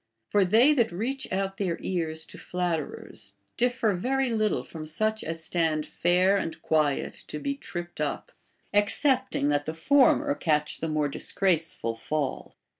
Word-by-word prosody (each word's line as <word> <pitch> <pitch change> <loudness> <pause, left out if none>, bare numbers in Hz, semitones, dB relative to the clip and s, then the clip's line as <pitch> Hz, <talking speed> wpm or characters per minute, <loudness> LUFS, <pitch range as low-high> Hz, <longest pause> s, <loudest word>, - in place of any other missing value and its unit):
For 205 - +4
they 225 +10 +5
that 235 -5 +2
reach 245 +9 -3
out 195 0 -1
their 185 -5 -1
ears 160 -3 -2
to - - -12
flatterers 160 - -4 0.2
diff"er 245 -3 +1
very 260 +7 0
little 215 -2 +1
from 160 -2 -8
such 215 +7 -1
as 165 0 -4
stand 160 -3 0
fair 180 +3 +3
and 165 -4 -3
quiet 150 -3 +1
to - - -5
be 280 - -2
trii)ped 175 -10 -7
up, - - -2 0.4
excepting 250 - +2
that 145 0 0
the 155 - -3
former 280 - +4
catch 150 - 0
the 160 - -2
more 155 -1 +1
disgraceful 165 -4 -1
fall. 145 +5 -3
180 Hz, 150 wpm, -27 LUFS, 155-225 Hz, 0.4 s, they